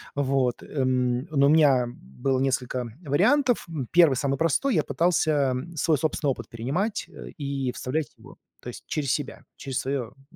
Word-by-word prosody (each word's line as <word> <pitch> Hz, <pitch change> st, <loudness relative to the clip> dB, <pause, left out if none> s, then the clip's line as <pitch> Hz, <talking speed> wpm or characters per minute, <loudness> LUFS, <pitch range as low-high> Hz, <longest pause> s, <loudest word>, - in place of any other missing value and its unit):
Вот, 135 Hz, -3 st, 0 dB
м, 130 Hz, -2 st, 0 dB
ну, 140 Hz, -3 st, +3 dB
у -, -, +4 dB
меня 140 Hz, -6 st, +5 dB
было 120 Hz, -, -3 dB
несколько 130 Hz, -2 st, -1 dB, 0.2 s
вариантов. 245 Hz, -, +2 dB
М, 140 Hz, -7 st, -4 dB
1- 165 Hz, -5 st, +6 dB
самый 135 Hz, +1 st, -1 dB
простой, 165 Hz, -, +1 dB
я -, -, +3 dB
пытался 155 Hz, -6 st, +1 dB, 0.2 s
свой 160 Hz, 0 st, +2 dB
собственный 150 Hz, -1 st, 0 dB
опыт 115 Hz, -4 st, -7 dB
перенимать 145 Hz, -, -2 dB, 0.3 s
и 140 Hz, -3 st, -2 dB
вставлять 150 Hz, +4 st, -3 dB
его, -, -, -15 dB, 0.2 s
то -, -, -11 dB
есть -, -, -10 dB
через 140 Hz, -4 st, -1 dB
себя, 145 Hz, -3 st, -3 dB
через 135 Hz, -2 st, -4 dB
своё, 130 Hz, -2 st, -2 dB
м 135 Hz, +5 st, -24 dB
140 Hz, 160 wpm, -25 LUFS, 130-155 Hz, 0.3 s, 1